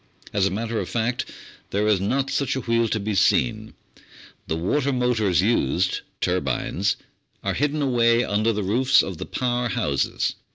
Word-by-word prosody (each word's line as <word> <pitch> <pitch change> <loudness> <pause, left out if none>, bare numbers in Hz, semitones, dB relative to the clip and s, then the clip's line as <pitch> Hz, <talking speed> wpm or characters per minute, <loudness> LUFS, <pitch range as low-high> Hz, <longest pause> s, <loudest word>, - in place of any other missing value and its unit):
As 100 -2 +2
a - - 0
matter 110 +3 -2
of - - -4
fact, 120 +2 -1 0.4
there 105 +2 0
is 105 -3 +3
not 135 +7 0
such 140 -2 0
a 130 - -2
wheel 115 -1 +1
to 110 - -1
be 105 +1 -2
seen, 65 -10 +1 0.7
the 80 - -1
water 130 - 0
motors 115 -8 +2
used 95 - +1 0.2
turbines 95 +1 0 0.5
are - - 0
hidden 150 +2 0
away 120 -2 +3
under 110 +1 +1
the 105 -2 -2
roofs 125 +7 +4
of 95 -4 -6
the - - -5
power 125 -1 -1
houses. 90 - 0
115 Hz, 165 wpm, -24 LUFS, 100-125 Hz, 0.7 s, roofs